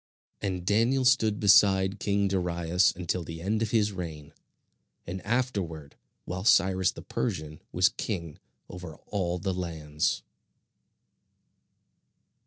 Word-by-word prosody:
And 90 -3 -3
Daniel 115 +6 +2
stood 110 -5 +3
beside 95 -1 +5
king 100 -1 +1
Darius 90 -1 +1
until 90 0 -2
the 80 0 -7
end 105 +6 -1
of 115 - 0
his 105 -2 +2
reign, 80 -6 -7 0.7
and 90 +1 -6
afterward 100 - -2 0.3
while 90 +1 -4
Cyrus 95 -3 +4
the - - -7
Persian 75 0 -4
was 90 +1 +4
king 85 -8 -5 0.3
over 90 -3 -9 0.2
all 90 -4 -1
the 95 +1 -2
lands. 80 -4 -2
95 Hz, 115 wpm, -28 LUFS, 85-105 Hz, 0.7 s, beside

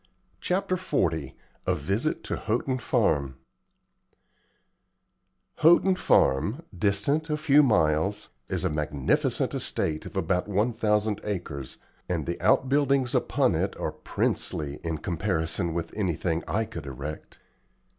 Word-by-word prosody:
CHAPTER 185 0 0
XL 80 - 0 0.4
A - - +3
VISIT 100 - -1
TO - - -3
HOUGHTON 125 +4 -1
FARM 70 - +1 2.2
Houghton 175 +4 +5
Farm, 105 - +2
distant 105 - 0
a 150 - 0
few 150 -1 +5
miles, 95 - +2 0.2
is 90 -2 -2
a 90 - +1
magnificent 75 -3 0
estate 75 -1 -2
of - - -8
about 90 +1 0
one 105 +4 +1
thousand 105 -1 +1
acres, 85 -10 -5 0.3
and 85 -5 -1
the 85 - -4
outbuildings 135 -1 +3
upon - - +2
it - - -1
are - - -2
princely 75 -1 -2
in 80 -1 -2
comparison 85 0 -1
with 85 0 -4
anything 85 -4 -1
I 105 +8 0
could 80 -9 -8
erect. 70 +3 -7
95 Hz, 120 wpm, -27 LUFS, 80-120 Hz, 2.2 s, Houghton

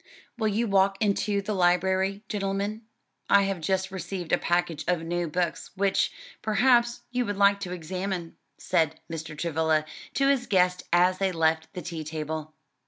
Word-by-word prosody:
"Will 220 -3 0
you 215 +3 +1
walk 195 -1 +3
into 205 -1 +1
the 210 +1 -2
library, 190 +2 +2
gentlemen? 200 +1 -2 0.5
I 200 0 +6
have 195 -3 -2
just 190 +3 0
received 180 -1 -5
a - - +5
package 175 -3 0
of 175 -2 +1
new 175 +1 -1
books, 170 -1 -2
which, 195 0 +2 0.3
perhaps, 240 +2 +3
you 250 0 +1
would 205 -1 -2
like 200 0 +5
to 185 -3 -5
examine," 180 0 -4 0.2
said 160 -1 0
Mr. 160 -1 -6
Travilla 160 -1 +1 0.3
to 275 +1 +3
his 270 -3 +2
guests 180 -3 +3
as 180 +2 +4
they 195 -1 +1
left 160 -1 +1
the 180 - -6
tea 165 -2 -5
table. 155 0 -5
185 Hz, 165 wpm, -27 LUFS, 165-200 Hz, 0.5 s, I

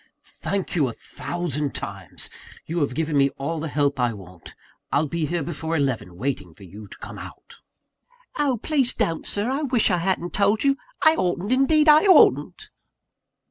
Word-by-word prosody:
"Thank 195 -2 -4
you 150 -6 +3
a 120 - -4
thousand 150 -3 -4
times! 95 -3 -5 0.4
you 170 +2 -2
have 140 -4 -1
given 160 -1 -1
me 140 0 +4
all 155 +4 -3
the 160 - -3
help 145 -2 0
I 120 -2 +1
want. 90 -4 -13 0.4
I'll 145 +2 +2
be 155 +1 -2
here 170 -1 -1
before 160 +1 -3
eleven, 130 - -2
waiting 95 - -4
for - - -15
you 100 +3 -11
to - - -13
come - - -9
out." - - -12 0.8
"Oh, 275 -4 +2
please 275 -5 +1
don't, 165 -1 -1
Sir 210 +5 -1
I 275 +3 -1
wish 250 -8 +2
I 180 - +2
hadn't 175 0 -1
told 205 +2 +2
you 275 -1 +3 0.3
I 315 - +8
oughtn't, 185 - -1
indeed 300 +4 +4
I 305 +4 +7
oughtn't!" 375 - +4
165 Hz, 180 wpm, -23 LUFS, 135-205 Hz, 0.8 s, I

